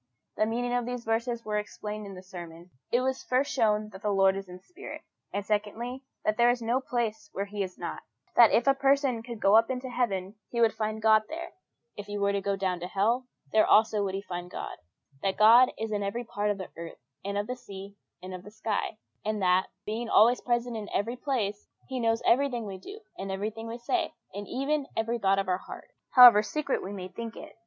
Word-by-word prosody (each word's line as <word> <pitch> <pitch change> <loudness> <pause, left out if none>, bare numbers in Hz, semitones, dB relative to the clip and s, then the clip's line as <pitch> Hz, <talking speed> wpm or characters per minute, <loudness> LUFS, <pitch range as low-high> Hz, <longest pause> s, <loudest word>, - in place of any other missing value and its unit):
The 215 - +2
meaning 245 +2 -1
of 245 -1 0
these 245 -1 -4
verses 230 +1 -1
was 210 -1 -1
explained 210 0 -6
in 195 - -8
the 185 - -10
sermon. 175 -1 -10 0.2
It 245 - +3
was 265 0 -1
first 255 +3 0
shown 215 -3 +2
that 190 -2 -12
the 210 - -1
Lord 195 -1 +4
is 195 -1 -6
a 180 - -9
spirit; 360 - -10 0.3
and, 200 0 -3
secondly, 215 +5 -2 0.2
that 215 - +1
there 240 0 +5
is 245 0 +2
no 235 +3 0
place 245 +4 -2
where 200 - -2
He 205 0 -5
is 185 -2 -4
not: - - -5 0.3
that 235 -2 +8
if 235 - +3
a 275 - +6
person 275 -3 +2
could 235 -1 -8
go 200 +1 +5
up 225 +1 +5
into 255 0 -3
heaven, 195 -6 -1 0.2
he 235 - -3
would 230 -1 +4
find 215 0 -3
God 220 -1 +6
there; 335 +2 -6 0.4
if 205 0 -8
he 205 0 -4
were 200 0 +2
to 200 0 -1
go 200 0 0
down 185 -2 -1
to 175 - -5
hell, 230 +7 +1 0.2
there 215 - +5
also 215 -1 +4
would 195 -1 -2
he 195 - -4
find 175 -2 -6
God: - - -6 0.5
that 195 -1 0
God 235 +4 +7
is 220 0 -3
in 205 -1 -1
every 205 +5 -2
part 210 -3 -2
of 205 - 0
the 185 - -7
earth, 165 0 -8 0.3
and 200 +1 -3
of 205 - 0
the 250 - -4
sea, 200 -4 -10 0.3
and 185 0 -7
of 185 - -6
the 205 - -10
sky; 215 0 -3 0.3
and 215 0 -1
that, 180 +1 +3 0.2
being 225 +2 -3
always 235 +4 +5
present 240 -1 0
in 215 -2 -5
every 230 +4 0
place, 225 -7 -2 0.2
He 260 -1 -3
knows 230 -1 +1
everything 245 -2 +2
we 195 -2 -6
do 405 - -10 0.2
and 195 0 -4
everything 215 +3 -4
we 230 +1 -5
say, 330 +8 -1 0.2
and 205 +1 -6
even 275 +2 -1
every 230 +2 0
thought 195 -2 +3
of 195 - 0
our 180 0 +1
hearts, - - -11 0.2
however 245 -5 +11
secret 280 +5 -2
we 190 - -5
may 190 -2 -6
think 225 +4 -7
it. - - -10
215 Hz, 230 wpm, -28 LUFS, 200-245 Hz, 0.5 s, however